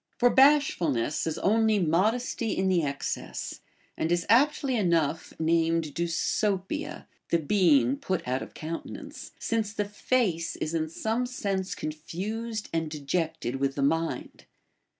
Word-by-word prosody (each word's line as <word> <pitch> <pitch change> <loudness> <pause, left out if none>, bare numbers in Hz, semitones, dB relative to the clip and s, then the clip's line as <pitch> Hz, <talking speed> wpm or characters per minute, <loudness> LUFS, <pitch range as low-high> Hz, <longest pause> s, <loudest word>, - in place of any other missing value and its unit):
For 245 0 +4
bashfulness 175 - +3
is 160 - -2
only 220 +1 +3
modesty 215 +6 +1
in 190 0 +2
the 180 -2 +3
excess, 140 -2 -4 0.3
and 160 - -1
is 175 -1 +1
aptly 270 +2 +4
enough 170 -7 +1
named 165 0 +2
δνσωττία 190 - -1 0.2
{the 170 - +4
being 145 - +3
put 185 -4 -3
out 130 +1 0
of - - -9
countenance), 165 +2 -7
since 225 -2 -1
the 205 -2 -1
face 205 -5 0
is 155 - -3
in 160 -1 -1
some 225 +8 -1
sense 195 -6 -2
confused 205 +9 -4
and 165 -1 0
dejected 155 -2 -2
with 135 0 -1
the 140 - 0
mind. 165 +3 -1
170 Hz, 130 wpm, -28 LUFS, 160-220 Hz, 0.3 s, For